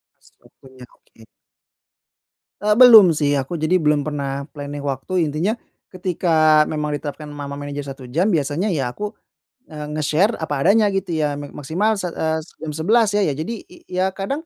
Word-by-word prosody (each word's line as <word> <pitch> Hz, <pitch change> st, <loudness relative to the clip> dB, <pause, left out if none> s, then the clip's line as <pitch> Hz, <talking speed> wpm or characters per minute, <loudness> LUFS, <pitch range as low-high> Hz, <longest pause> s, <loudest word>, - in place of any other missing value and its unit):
Pas -, -, -25 dB, 0.2 s
waktunya, 130 Hz, -1 st, -16 dB
oke. 110 Hz, -, -21 dB, 1.4 s
Eee, 210 Hz, 0 st, +3 dB
belum 220 Hz, -7 st, +8 dB
sih. 145 Hz, -2 st, +1 dB
Aku 135 Hz, +5 st, -3 dB
jadi 165 Hz, +2 st, +1 dB
belum 150 Hz, -3 st, +2 dB
pernah 140 Hz, -1 st, -4 dB
planning 145 Hz, -1 st, -7 dB
waktu. 145 Hz, +6 st, -2 dB
Intinya, 165 Hz, +9 st, 0 dB, 0.4 s
ketika 160 Hz, -4 st, +3 dB
memang 150 Hz, -1 st, -3 dB
diterapkan 150 Hz, +1 st, -7 dB
ma 145 Hz, -1 st, -7 dB
ma 140 Hz, -, -6 dB
manajer 145 Hz, 0 st, -6 dB
1 135 Hz, -2 st, -9 dB
jam, 180 Hz, -, +1 dB
biasanya 160 Hz, +6 st, 0 dB
ya 135 Hz, -6 st, -1 dB
aku, 210 Hz, -, -6 dB, 0.5 s
eee, 150 Hz, -1 st, -8 dB
nge-share 160 Hz, +9 st, +1 dB
apa 150 Hz, -4 st, -3 dB
adanya 210 Hz, +7 st, +4 dB
gitu 190 Hz, -4 st, -2 dB
ya, 150 Hz, -2 st, 0 dB
"Me 145 Hz, 0 st, -7 dB
maksimal 185 Hz, +10 st, -1 dB
sa 180 Hz, -3 st, -4 dB
eee, 160 Hz, 0 st, -1 dB
se -, -, -20 dB
jam 160 Hz, -, -5 dB
11 205 Hz, +9 st, +2 dB
ya." 205 Hz, -, +2 dB
Iya 145 Hz, -, 0 dB
jadi 195 Hz, +9 st, -4 dB
i 180 Hz, -, -17 dB
iya 185 Hz, +1 st, 0 dB
kadang 275 Hz, -, -4 dB
155 Hz, 180 wpm, -20 LUFS, 145-185 Hz, 1.4 s, belum